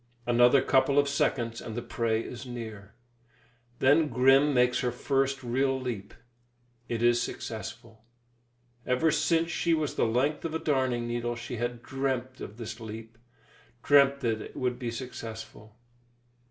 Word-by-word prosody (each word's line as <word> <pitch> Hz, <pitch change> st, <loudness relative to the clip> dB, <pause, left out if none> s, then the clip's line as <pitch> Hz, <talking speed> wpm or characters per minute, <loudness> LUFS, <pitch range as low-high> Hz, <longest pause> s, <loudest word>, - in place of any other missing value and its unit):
Another 120 Hz, +3 st, +5 dB
couple 135 Hz, +1 st, +3 dB
of 145 Hz, 0 st, +4 dB
seconds 120 Hz, -4 st, 0 dB
and 110 Hz, -, -7 dB
the 120 Hz, -, -3 dB
prey 115 Hz, -1 st, -1 dB
is 125 Hz, -, -8 dB
near. 110 Hz, -4 st, -8 dB, 0.8 s
Then 145 Hz, +5 st, +4 dB
Grim 135 Hz, +3 st, +4 dB
makes 125 Hz, -2 st, +3 dB
her 125 Hz, -, 0 dB
first 135 Hz, 0 st, 0 dB
real 130 Hz, +2 st, 0 dB
leap. 120 Hz, -6 st, -5 dB, 0.7 s
It 115 Hz, -1 st, -2 dB
is 120 Hz, 0 st, +4 dB
successful. 110 Hz, -2 st, -7 dB, 0.8 s
Ever 125 Hz, +6 st, +2 dB
since 165 Hz, +2 st, +1 dB
she 170 Hz, -1 st, +1 dB
was 155 Hz, -2 st, -2 dB
the -, -, +1 dB
length 130 Hz, +7 st, 0 dB
of 165 Hz, -1 st, -3 dB
a -, -, +2 dB
darning 130 Hz, -6 st, 0 dB
needle, 120 Hz, 0 st, -2 dB
she 120 Hz, +1 st, -6 dB
had 120 Hz, +1 st, -3 dB
dreamt 130 Hz, -1 st, -3 dB
of 105 Hz, -, -8 dB
this 110 Hz, -2 st, -7 dB
leap, 115 Hz, +1 st, -9 dB, 0.6 s
dreamt 140 Hz, -1 st, +5 dB
that 115 Hz, -3 st, 0 dB
it -, -, -10 dB
would 125 Hz, -1 st, -1 dB
be 120 Hz, -3 st, -3 dB
successful. 115 Hz, -3 st, -8 dB
125 Hz, 150 wpm, -28 LUFS, 115-135 Hz, 0.8 s, Another